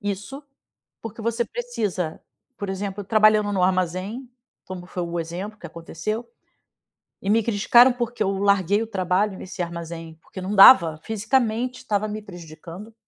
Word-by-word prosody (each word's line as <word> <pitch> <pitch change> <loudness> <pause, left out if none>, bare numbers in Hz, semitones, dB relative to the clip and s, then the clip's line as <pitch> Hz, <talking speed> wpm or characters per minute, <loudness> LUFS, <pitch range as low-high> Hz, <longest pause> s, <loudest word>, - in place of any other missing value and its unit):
isso, 205 +7 -5 0.6
porque 225 0 -8
você 230 +1 0
precisa", 210 - -4 0.4
por 200 -1 -5
exemplo, 195 +1 -4
trabalhando 215 0 +3
no 190 -2 0
armazém, 185 +7 -1 0.4
como 180 -1 -8
foi 180 - -4
o 170 0 -4
exemplo 185 +6 -6
que 170 - -8
aconteceu, 170 +8 -5 0.9
e 195 - -2
me 225 +2 +3
criticaram 235 +4 +5
porque 240 -1 -3
eu 195 - +1
larguei 200 +1 +2
o - - -4
trabalho 190 0 0
nesse 185 0 -9
armazém, 170 -1 -7
porque 190 - -10
não 190 +3 -3
dava, 170 -6 +8
fisicamente 240 +3 -1
tava 210 0 0
me 215 0 -5
prejudicando 175 +3 -11
200 Hz, 145 wpm, -23 LUFS, 180-225 Hz, 0.9 s, dava